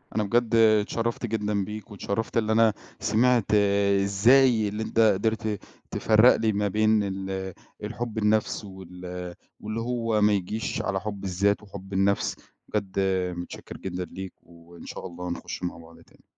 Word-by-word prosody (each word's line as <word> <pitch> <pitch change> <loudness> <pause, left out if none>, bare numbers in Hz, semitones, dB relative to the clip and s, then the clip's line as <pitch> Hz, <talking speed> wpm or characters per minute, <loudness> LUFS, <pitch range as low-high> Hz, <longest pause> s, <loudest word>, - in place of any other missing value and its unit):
أنا 110 - +2
بجد 115 +2 +1
اتشرّفت 115 +2 +2
جدًا 105 -3 -1
بيك 105 +2 -8
واتشرّفت 105 +3 -3
اللي 110 -1 +1
أنا 110 -1 +4 0.3
سمعت 120 0 +3 0.6
إزاي 115 +3 +4
اللي 105 +2 -3
أنت 115 - -2
قدرت 110 0 +2 0.3
تفرّق 110 +3 +5
لي 110 -1 +1
ما 105 0 0
بين 110 +1 +2
ال 95 -1 -4 0.3
الحُب 115 +1 -4
النَفْس 110 0 +1
وال 90 -2 -8 0.2
واللي 110 +2 -4
هو 115 -2 0
ما 105 0 +5
يجيش 100 +3 -2
على 95 - -1
حُب 100 -2 -5
الذات 100 +3 +1
وحُب 100 -1 -10
النَفْس، 95 +1 +1 0.3
بجد 100 -2 -2 0.4
متشكر 90 - -8
جدًا 90 -1 -4
ليك 95 +2 -8
وإن 85 0 -15
شاء - - -7
الله 90 0 -7
نخُش 85 - -6
مع 90 - -3
بعض 85 0 -15
تاني. - - -23
105 Hz, 150 wpm, -26 LUFS, 95-110 Hz, 0.6 s, تفرّق